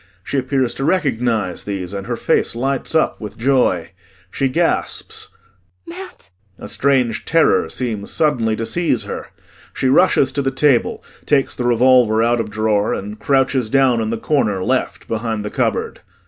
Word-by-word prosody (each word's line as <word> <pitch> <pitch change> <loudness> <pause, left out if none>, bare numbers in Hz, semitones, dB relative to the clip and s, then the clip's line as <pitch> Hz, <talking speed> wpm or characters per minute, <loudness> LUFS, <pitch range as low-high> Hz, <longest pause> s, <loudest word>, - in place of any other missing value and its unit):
She 140 - -1
appears 130 -1 0
to 135 - -5
recognize 120 - 0
these 100 -2 -5
and 100 -1 -5
her - - -2
face - - +1
lights 135 +5 -1
up 160 - +1
with 105 - -8
joy. 120 -9 +1 0.4
She 135 - 0
gasps:] 165 +5 -1 0.6
Mat! 345 - -10 0.3
[A - - -9
strange 125 -2 +1
terror 165 0 +2
seems 110 -5 -3
suddenly 120 -8 +1
to 115 - -3
seize 145 0 0
her. - - -6 0.5
She 130 - 0
rushes 135 0 +4
to 140 - -1
the 135 - 0
table, 135 -2 +1 0.2
takes 140 -2 +2
the 125 - -4
revolver 120 -2 +4
out 120 +1 +2
of 110 -2 -3
drawer 105 0 0
and 105 +2 -7
crouches 135 -3 +1
down 130 -2 +3
in 110 - -2
the 115 - -2
corner, 105 -8 0
left, - - -2
behind 110 -1 -3
the 105 - -4
cupboard. - - -1
120 Hz, 160 wpm, -19 LUFS, 110-135 Hz, 0.6 s, rushes